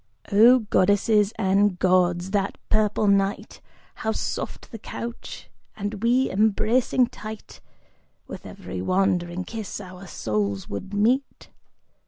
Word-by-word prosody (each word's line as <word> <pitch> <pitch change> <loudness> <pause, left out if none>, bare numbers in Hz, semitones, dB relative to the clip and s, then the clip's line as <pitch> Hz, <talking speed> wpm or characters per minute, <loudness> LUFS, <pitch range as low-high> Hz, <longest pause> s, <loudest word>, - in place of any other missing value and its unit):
Oh 235 +5 +7
Goddesses 205 +2 +3
and 195 -1 +2
Gods, 180 0 +2
that 200 -1 -1
purple 215 0 +2
night 200 0 0 0.3
How 220 - -3
soft - - -5
the 225 - -8
couch! 235 +3 -7 0.3
And 205 0 -4
we, 245 +3 +3
embracing 220 +5 +2
tight; 220 -2 -10 0.6
With - - -9
every 90 - -7
wandering 185 - 0
kiss 220 +1 -6
our 185 -1 -10
souls 100 - -2
would 190 - -6
meet! 235 +7 0
200 Hz, 115 wpm, -24 LUFS, 185-220 Hz, 0.6 s, Oh